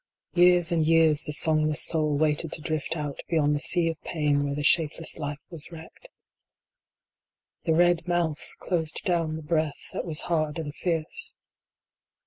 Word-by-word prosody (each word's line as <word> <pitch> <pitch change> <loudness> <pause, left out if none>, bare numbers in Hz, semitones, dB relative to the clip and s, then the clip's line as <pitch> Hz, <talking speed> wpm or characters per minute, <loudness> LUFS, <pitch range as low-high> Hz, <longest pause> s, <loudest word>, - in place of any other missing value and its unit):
Years 175 -1 +4
and 165 -2 +2
years 160 -1 +4
the - - -3
songless 155 0 +2
soul 155 -3 +1
waited 155 +1 +1
to - - -5
drift 155 0 -3
out 145 -2 -5
beyond 150 -3 +2
the 145 - -1
sea 170 +2 +1
of 165 -1 -4
pain 150 -3 0
where 140 0 -2
the 145 - -3
shapeless 160 +1 +2
life 145 -1 -4
was 165 0 -6
wrecked. 165 - -12 1.6
The 160 - +2
red 175 0 +2
mouth 170 -3 -1
closed 160 -3 -2
down 165 -3 0
the 160 - -7
breath 155 -1 -2
that - - -3
was 160 -3 +1
hard 155 -3 -1
and 150 -3 -5
fierce. 165 - -3
160 Hz, 160 wpm, -26 LUFS, 150-170 Hz, 1.6 s, Years